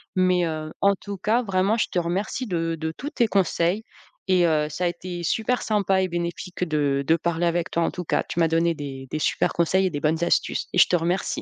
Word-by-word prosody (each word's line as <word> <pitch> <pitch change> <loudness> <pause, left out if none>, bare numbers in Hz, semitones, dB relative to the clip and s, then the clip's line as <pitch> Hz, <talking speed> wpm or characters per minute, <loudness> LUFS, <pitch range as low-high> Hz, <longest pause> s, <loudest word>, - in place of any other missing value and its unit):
Mais 185 -1 +3
heu, 155 -1 -4
en 200 0 +4
tout 200 +1 -7
cas, 220 +6 +1
vraiment, 195 0 +1
je 220 - +1
te 180 - +1
remercie 195 +8 -2
de 165 -2 -1
de 160 0 -3
tous 290 - -5
tes 240 -7 +1
conseils 190 0 +1 0.4
et 185 -2 +4
heu, 155 -2 +2
ça 155 +5 -4
a - - +3
été 175 0 -5
super 225 +7 0
sympa 195 -3 +1
et 185 - +1
bénéfique 175 +1 -4
de 145 -4 0
de 160 - +5
parler 170 0 -1
avec 170 0 -1
toi, 170 - +1
en - - 0
tout 180 - -5
cas. - - 0
Tu - - -3
m'as 165 - +4
donné 165 +1 +2
des 135 -3 -7
des 155 - -3
supers - - +1
conseils 185 +3 +2
et - - 0
des 145 -4 -4
bonnes 160 +3 0
astuces 175 - 0
et - - -1
je - - +8
te 180 - +2
remercie. 175 +3 -1
175 Hz, 240 wpm, -24 LUFS, 165-190 Hz, 0.4 s, je